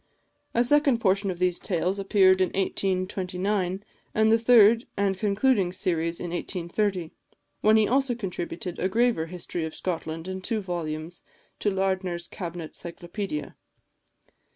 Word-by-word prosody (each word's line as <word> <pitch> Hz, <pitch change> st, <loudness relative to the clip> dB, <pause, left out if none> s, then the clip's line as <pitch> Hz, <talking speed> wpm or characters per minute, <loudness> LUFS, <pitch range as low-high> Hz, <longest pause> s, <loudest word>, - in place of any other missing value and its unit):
A 240 Hz, -, +4 dB
second 280 Hz, -1 st, +3 dB
portion 195 Hz, -1 st, +2 dB
of 180 Hz, -, -3 dB
these 180 Hz, 0 st, +1 dB
tales 185 Hz, +2 st, -1 dB
appeared 190 Hz, -1 st, +4 dB
in 185 Hz, -, +4 dB
1829, 190 Hz, 0 st, -1 dB, 0.3 s
and 220 Hz, 0 st, +4 dB
the 225 Hz, -, +5 dB
third 230 Hz, 0 st, +6 dB
and 200 Hz, -1 st, +1 dB
concluding 200 Hz, 0 st, +2 dB
series 170 Hz, -3 st, -1 dB
in 175 Hz, -, -5 dB
1830, 175 Hz, 0 st, -2 dB, 0.5 s
when 215 Hz, +1 st, +5 dB
he 215 Hz, -1 st, +4 dB
also 265 Hz, 0 st, +2 dB
contributed 180 Hz, -4 st, -5 dB
a 185 Hz, -, +1 dB
graver 230 Hz, -6 st, +2 dB
History 175 Hz, -1 st, -5 dB
of 160 Hz, 0 st, -5 dB
Scotland 165 Hz, -2 st, -4 dB
in 190 Hz, 0 st, -4 dB
two 220 Hz, +3 st, -1 dB
volumes 170 Hz, -3 st, -5 dB, 0.4 s
to 210 Hz, -, +1 dB
Lardner's 190 Hz, -3 st, -1 dB
Cabinet 170 Hz, -3 st, -6 dB
Cyclopædia. 175 Hz, -1 st, -5 dB
190 Hz, 135 wpm, -26 LUFS, 175-210 Hz, 0.5 s, third